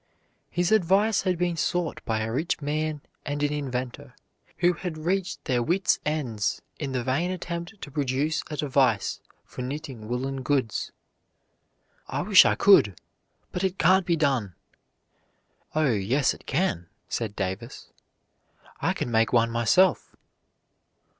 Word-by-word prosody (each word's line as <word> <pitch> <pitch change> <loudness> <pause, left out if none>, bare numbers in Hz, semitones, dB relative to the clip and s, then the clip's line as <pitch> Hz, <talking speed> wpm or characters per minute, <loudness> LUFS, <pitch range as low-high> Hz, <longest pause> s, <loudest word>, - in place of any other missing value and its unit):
His 175 +2 0
advice 205 +1 +3
had 185 -2 0
been 175 0 0
sought 175 0 -1
by 110 -1 0
a 110 +1 -2
rich 150 +8 -1
man 155 0 -2 0.2
and 145 0 -3
an 145 0 +1
inventor 130 -4 -4 0.4
who 175 0 +3
had 170 -2 -5
reached 185 +4 -2
their 125 -5 +1
wits' 180 +10 +1
ends 130 -10 -1 0.2
in 140 -3 -3
the 130 -2 -1
vain 140 +8 0
attempt 175 +2 -5
to 145 - -8
produce 145 +3 0
a 150 - -5
device 135 -8 +1 0.3
for - - -8
knitting 130 -4 -6
woolen 130 +3 -3
goods. 130 -5 -1 1.2
"I - - -2
wish 200 -3 +7
I - - +3
could, 105 - +5 0.5
but 180 - -3
it 190 0 0
can't 185 0 +4
be 170 - +3
done." 135 - 0 1.2
"Oh, 155 -4 +3
yes 115 +7 +1
it - - -16
can," 130 - 0 0.2
said 110 -3 -3
Davis; 95 +6 -5 0.9
"I - - +1
can 120 - -3
make 115 0 +3
one 115 -1 +3
myself." 155 +11 +2
145 Hz, 140 wpm, -26 LUFS, 125-175 Hz, 1.2 s, wish